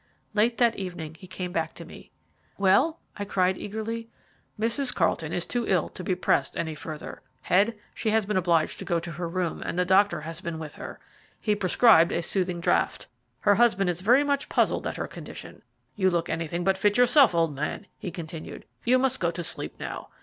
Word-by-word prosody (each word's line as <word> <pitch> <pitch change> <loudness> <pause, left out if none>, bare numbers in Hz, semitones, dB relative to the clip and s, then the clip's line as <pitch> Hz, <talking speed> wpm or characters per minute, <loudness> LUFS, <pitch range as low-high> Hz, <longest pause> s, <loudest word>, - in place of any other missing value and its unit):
Late 225 +3 +2
that 235 -2 +3
evening 175 -5 -5
he 185 +3 -13
came 180 -1 -5
back - - -2
to - - -9
me. - - -13 0.5
"Well?" 205 - +3 0.2
I 205 - -3
cried 185 -2 +1
eagerly. 225 +3 -5 0.5
"Mrs. 235 +4 +1
Carlton 165 -2 0
is 175 - -1
too 240 -2 -2
ill 180 -4 +2
to 185 - -8
be 185 0 0
pressed - - +1
any 160 -1 -2
further, 155 0 -8 0.2
Head; 210 +5 +2 0.2
she 220 - -2
has 220 -1 +2
been 210 0 -2
obliged 170 -3 +2
to - - -6
go 170 - +1
to 170 +1 -7
her 170 +2 -4
room, 175 -1 -2
and - - -4
the 180 - +2
doctor 195 0 +3
has 165 +2 -6
been 170 -3 -4
with 155 -2 -7
her. - - -8 0.4
He 210 - +1
prescribed 190 -2 +5
a 170 - -1
soothing 180 -1 -1
draught. 170 - +1 0.4
Her 205 - +5
husband 200 -4 +3
is 175 +1 -6
very 245 +8 +5
much 285 -1 -1
puzzled - - +1
at - - -4
her - - -2
condition. - - -10 0.3
You 190 -4 +3
look 170 -2 -1
anything 165 +2 -2
but 190 0 +1
fit 205 +2 +3
yourself, 245 - +6
old 165 -3 +2
man," 150 +8 -4
he 190 - -4
continued. 165 -2 -8 0.2
"You 250 +2 +4
must 260 0 +1
go 170 - +1
to 170 +1 -4
sleep - - -5
now. - - -6
185 Hz, 205 wpm, -26 LUFS, 170-220 Hz, 0.5 s, yourself